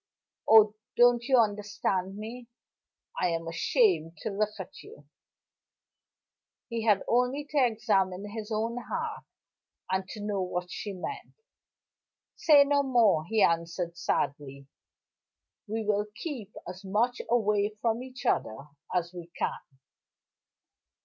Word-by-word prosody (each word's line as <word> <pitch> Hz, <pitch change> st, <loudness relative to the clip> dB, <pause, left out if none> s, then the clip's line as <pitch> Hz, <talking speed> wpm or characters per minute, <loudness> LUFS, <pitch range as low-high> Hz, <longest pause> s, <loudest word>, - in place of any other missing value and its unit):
Oh, 215 Hz, -1 st, +8 dB, 0.2 s
don't 240 Hz, 0 st, +6 dB
you 265 Hz, -1 st, +4 dB
understand 205 Hz, -3 st, 0 dB
me? 235 Hz, +3 st, -8 dB, 0.7 s
I 180 Hz, -, +2 dB
am 165 Hz, 0 st, -2 dB
ashamed 165 Hz, -, +1 dB
to 220 Hz, -, -2 dB
look 210 Hz, +1 st, -1 dB
at -, -, -8 dB
you!" 450 Hz, +3 st, -15 dB, 1.6 s
He 230 Hz, -1 st, -3 dB
had 210 Hz, -3 st, +4 dB
only 250 Hz, +4 st, +1 dB
to 290 Hz, -3 st, +3 dB
examine 205 Hz, -5 st, +1 dB
his 220 Hz, +1 st, -7 dB
own 225 Hz, +2 st, -1 dB
heart, 245 Hz, -, -4 dB, 0.7 s
and 190 Hz, 0 st, -1 dB
to 215 Hz, -, -7 dB
know 205 Hz, -2 st, -1 dB
what 180 Hz, -1 st, -3 dB
she 205 Hz, -, -5 dB
meant. 195 Hz, -, -7 dB, 1.0 s
"Say 295 Hz, -3 st, +6 dB
no 285 Hz, 0 st, +2 dB
more," 230 Hz, -, +3 dB
he 220 Hz, 0 st, +3 dB
answered 170 Hz, +1 st, 0 dB
sadly. 140 Hz, -5 st, -2 dB, 1.0 s
"We 220 Hz, +1 st, -3 dB
will 210 Hz, 0 st, +1 dB
keep 230 Hz, -, -6 dB
as 185 Hz, +2 st, -8 dB
much 220 Hz, +6 st, 0 dB
away 210 Hz, -2 st, +1 dB
from 230 Hz, +1 st, 0 dB
each 255 Hz, 0 st, -9 dB
other 110 Hz, -, +1 dB, 0.3 s
as 175 Hz, -1 st, -1 dB
we 175 Hz, -2 st, -8 dB
can." -, -, -1 dB
210 Hz, 125 wpm, -29 LUFS, 185-240 Hz, 1.6 s, Oh